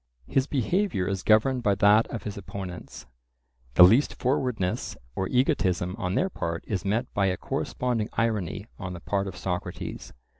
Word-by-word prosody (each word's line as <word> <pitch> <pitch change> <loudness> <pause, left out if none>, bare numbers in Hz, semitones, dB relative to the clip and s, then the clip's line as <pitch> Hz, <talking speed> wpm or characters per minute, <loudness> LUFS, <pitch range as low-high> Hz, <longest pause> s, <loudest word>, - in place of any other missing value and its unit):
His 135 - +1
behaviour 145 - 0
is 95 -1 -2
governed 115 +5 +3
by 100 -4 +2
that 105 +3 +5
of 115 -4 -6
his 105 - -5
opponents; 95 -7 -8 0.7
the - - +9
least 115 +11 +5
forwardness 125 -8 -1 0.2
or 95 - -1
egotism 95 - +1
on 90 -2 -1
their 185 - +2
part 85 - -3
is 100 -3 -2
met 110 +5 -1
by 100 -1 +2
a 95 -1 0
corresponding 120 -4 -2
irony 105 -5 -1
on 95 -3 -5
the 90 - -7
part 100 +3 -1
of 95 - -7
Socrates. 90 -1 -5
100 Hz, 160 wpm, -27 LUFS, 95-120 Hz, 0.7 s, the